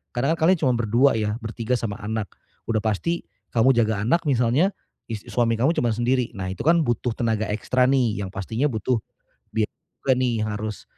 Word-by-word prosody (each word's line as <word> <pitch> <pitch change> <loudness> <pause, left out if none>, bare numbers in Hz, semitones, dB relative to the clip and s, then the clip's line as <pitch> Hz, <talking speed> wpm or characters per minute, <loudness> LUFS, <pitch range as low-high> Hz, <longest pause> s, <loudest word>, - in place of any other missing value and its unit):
Karna 135 +6 +2
kan 160 - +2
kalian 185 +1 +5
cuman 125 - +3
berdua 120 +5 +4
ya, 105 -1 0
bertiga 115 +2 -3
sama 105 -3 -3
anak, 110 -1 -2 0.4
udah 115 - +2
pasti 115 - -1 0.3
kamu 120 +3 +5
jaga 110 -3 +2
anak 165 +9 +3
misalnya, 130 +6 +3 0.4
is 105 -2 -4
suami 115 -1 +2
kamu 130 +8 +3
cuman 120 - +1
sendiri, 120 +1 +1
nah 95 -1 -3
itu 95 - -6
kan 165 +1 +4
butuh 120 0 0
tenaga 110 -2 0
ekstra 125 +4 +1
nih, 120 -6 +2
yang 95 - -5
pastinya 110 +8 -1
butuh 115 +2 0 0.5
biaya 110 -1 +1 0.3
juga 135 - +3
nih 120 -3 +1
yang - - -2
harus, 105 0 -5
115 Hz, 190 wpm, -24 LUFS, 110-130 Hz, 0.5 s, kalian